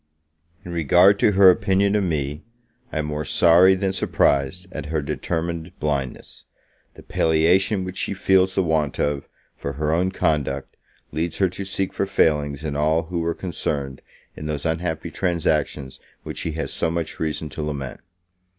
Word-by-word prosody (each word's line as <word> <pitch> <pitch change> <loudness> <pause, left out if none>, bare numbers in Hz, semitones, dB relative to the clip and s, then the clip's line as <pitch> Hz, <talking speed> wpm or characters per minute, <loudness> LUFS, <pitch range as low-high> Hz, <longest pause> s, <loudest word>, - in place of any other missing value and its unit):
In 90 - -7
regard 90 +5 +4
to 105 - +4
her 95 -1 +8
opinion 100 0 +1
of 105 - +2
me, 75 -3 -2 0.5
I - - -4
am 75 - -1
more 75 0 -3
sorry 85 +5 +5
than 95 0 -1
surprised 70 -1 +1
at 75 -4 -6
her 80 +1 -1
determined 85 +3 -4
blindness; 70 -4 -3 0.5
the - - -13
palliation 90 +6 +2
which 95 0 -6
she - - -2
feels 95 0 +3
the 95 - +2
want 80 -4 0
of, 75 -1 -1 0.3
for 70 - -5
her 75 +2 -1
own 90 +3 +1
conduct, 70 -6 -1 0.4
leads 80 +2 -2
her 95 -2 +2
to 95 +2 -6
seek 95 0 -2
for 100 - -1
failings 75 -5 +1
in 75 -2 -3
all 80 +2 +2
who 85 +1 -4
were 85 0 -1
concerned 75 -6 -3 0.3
in 75 - -6
those 75 -2 -3
unhapppy 80 0 -2
transactions 75 -6 -1 0.2
which - - -6
she 80 - -3
has 80 - -3
so - - 0
much 85 -1 -3
reason 80 0 -2
to 80 - -6
lament. 70 -4 -4
80 Hz, 170 wpm, -23 LUFS, 75-90 Hz, 0.5 s, her